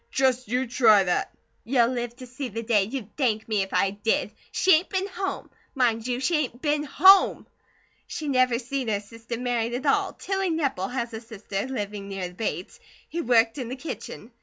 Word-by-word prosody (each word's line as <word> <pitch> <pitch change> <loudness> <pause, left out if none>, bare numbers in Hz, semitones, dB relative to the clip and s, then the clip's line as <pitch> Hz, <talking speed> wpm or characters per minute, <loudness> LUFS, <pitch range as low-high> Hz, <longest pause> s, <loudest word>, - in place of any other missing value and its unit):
"Just 255 -2 +1
you 250 +4 0
try 230 -5 +5
that!" 180 -1 0 0.3
"You'll 240 -1 +3
live 240 -2 -3
to 255 0 -10
see 250 +1 -6
the 230 +2 -5
day 215 -4 +3
you'd 220 -1 -6
thank 225 -6 0
me 215 -3 +1
if 195 - -4
I 195 - +2
did. 205 +1 0 0.2
She 380 - +4
ain't 320 +4 +3
been 380 -1 -1
home. 385 0 -4 0.2
Mind 235 -3 +1
you, 245 0 -1
she 315 +5 +1
ain't 250 -5 -2
been 295 +1 +1
HOME! 375 +7 +6 0.6
She 310 - -5
never 255 -3 +3
seen 265 +1 -3
her 210 -2 +1
sister 230 +3 -8
married 240 -1 -1
at 260 +4 -4
all! 275 - +2
Tilly 385 -1 -2
Nepple 280 - -1
has 240 -2 -3
a 220 - -5
sister, 215 -1 -5
living 205 -5 -4
near 190 -2 -4
the - - -15
Bates, 185 -2 -4 0.3
who 340 - -2
worked 230 +1 +3
in 245 -3 -4
the 255 - -4
kitchen. 255 -4 -7
245 Hz, 200 wpm, -25 LUFS, 220-270 Hz, 0.6 s, HOME